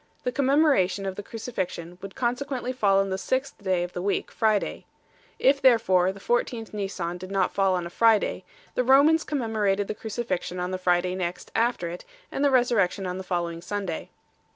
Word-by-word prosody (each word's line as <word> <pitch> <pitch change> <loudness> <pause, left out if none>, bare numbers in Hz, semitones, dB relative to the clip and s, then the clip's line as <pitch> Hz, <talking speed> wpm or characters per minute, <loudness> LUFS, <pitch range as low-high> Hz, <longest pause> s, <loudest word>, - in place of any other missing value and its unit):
The 250 - 0
commemoration 270 - +2
of 190 -1 -3
the 205 - -5
Crucifixion 190 -6 -5
would 195 -1 -8
consequently 255 0 -2
fall 200 -6 +3
on 195 0 0
the 190 - -2
sixth 260 +7 -2
day 185 -2 +1
of 175 - -6
the 180 - -4
week, 200 +2 -1
Friday. 215 -2 0 0.5
If 275 +1 +3
therefore 225 -8 +4
the 195 - -12
14th 235 0 -1
Nisan 185 -4 -3
did 185 +1 -8
not 195 -2 0
fall 195 -1 +2
on 175 -1 -2
a 170 - -7
Friday, 225 +1 +3 0.3
the 250 - +1
Romans 285 +5 +5
commemorated 215 -7 0
the - - -2
Cruci 220 +3 -5
fixion 180 -3 -3
on 180 +1 -2
the 185 - -3
Friday 180 0 +1
next 180 -1 -4
after 230 -6 +1
it, 175 +1 -7 0.3
and 275 - -2
the 285 - +5
Resurrection 235 -7 +2
on 180 0 -3
the - - -5
following 170 -2 -2
Sunday. 190 -2 -4
200 Hz, 190 wpm, -26 LUFS, 185-240 Hz, 0.5 s, Romans